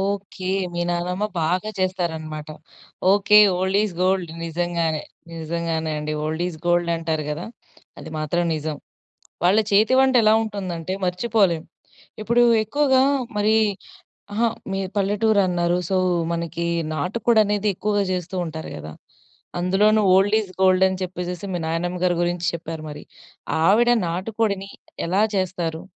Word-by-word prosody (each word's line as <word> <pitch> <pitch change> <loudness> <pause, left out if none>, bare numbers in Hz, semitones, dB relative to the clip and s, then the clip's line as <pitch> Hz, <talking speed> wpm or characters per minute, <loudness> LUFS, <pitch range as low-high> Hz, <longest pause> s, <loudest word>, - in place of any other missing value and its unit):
Okay. 195 -1 -3 0.3
మీ 175 - -2
నానమ్మ 180 +3 -1 0.2
బాగా 180 +6 0
చేస్తారనమాట. 160 -5 -3 0.6
Okay, 205 +1 +5 0.2
old 190 +2 +1
is 195 - -4
gold. 185 -3 +1
నిజంగానే. 165 -1 -1 0.3
నిజంగానే 165 -1 -2
అండి. 150 0 -3
ఓల్డ్ 160 +2 -2
ఇస్ 160 -3 -8
గోల్డ్ 175 0 +2
అంటారు 160 -2 -2
కదా! 155 +3 -4 0.5
అది - - -9
మాత్రం 165 +3 0
నిజం. 155 -1 -3 0.7
వాళ్ళ 190 +5 +5
చేతి 215 +5 +4
వంట 265 -1 +4
ఎలా 215 0 +5
ఉంటుందంటే 185 -5 -4
మర్చిపోలేం. 180 -3 +1 0.6
ఇప్పుడు 235 +2 +3 0.2
ఎక్కువగా 265 +3 +2 0.4
మరి 215 +1 +3 0.8
అహా! 230 +3 +2 0.3
మీరు 195 -1 -2
పల్లెటూరు 205 +1 +2
అన్నారు. 175 0 +1
సో, 190 - +1 0.4
మనకి 170 0 -3 0.3
నాటుకోడనేది 210 +5 +1
ఎక్కువగా 205 +1 0
చేస్తూ 180 +1 -4
ఉంటారు 160 0 -7
కదా! 75 0 -8 0.7
అందులోను 210 +4 +3
ఓల్డ్ 205 +3 +4
ఇస్ 200 - -7
గోల్డ్ 185 0 +5
అని 190 0 -4
చెప్పేసేసి 180 +1 -5
మీ - - -1
నాయనమ్మ 175 +2 -2
గారి 175 -1 +3
గురించి 175 0 -1
చెప్పారు 165 -1 -6
మరి. 150 0 -9 0.6
ఆవిడ 235 +6 +5 0.2
నాటుకోడిని 200 +2 -2 0.4
ఎలా 195 +4 +3
చేస్తారు? 175 -3 -2
180 Hz, 130 wpm, -22 LUFS, 165-205 Hz, 0.8 s, Okay